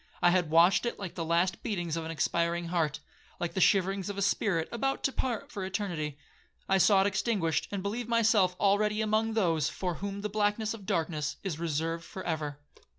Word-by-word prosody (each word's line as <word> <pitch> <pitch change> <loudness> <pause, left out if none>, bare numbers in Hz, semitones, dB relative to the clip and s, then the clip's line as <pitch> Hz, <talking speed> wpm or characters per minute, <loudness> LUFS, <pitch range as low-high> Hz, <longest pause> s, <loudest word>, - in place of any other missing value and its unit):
I 175 -1 +5
had 175 -3 +2
watched 175 +7 +5
it - - -3
like 195 -4 -6
the 170 - -3
last 170 +2 +1
beatings 175 -6 -2
of 165 - -3
an - - -5
expiring 170 +1 0
heart, 155 -4 0 0.4
like 170 -1 -2
the 190 - -1
shiverings 195 +1 +2
of 200 - -5
a 200 - 0
spirit 190 -4 +1
about 270 +4 -1
to 270 - +2
part 245 -4 -3
for 200 - -5
eternity. 175 -7 -3 0.5
I 195 0 +3
saw 195 +1 +5
it - - +2
extinguished 195 -4 0
and 200 -2 -4
believed 230 +4 -3
myself 220 -5 +3
already 210 +1 +2
among 220 +1 +1
those 165 -8 +2
for 180 -2 -3
'whom 200 0 -4
the 210 - -1
blackness 210 +1 0
of 205 -4 -10
darkness 160 -5 -1
is 175 -6 -3
reserved 165 +1 -2
for 190 - -8
ever.' 150 -4 -3
190 Hz, 200 wpm, -30 LUFS, 165-205 Hz, 0.5 s, I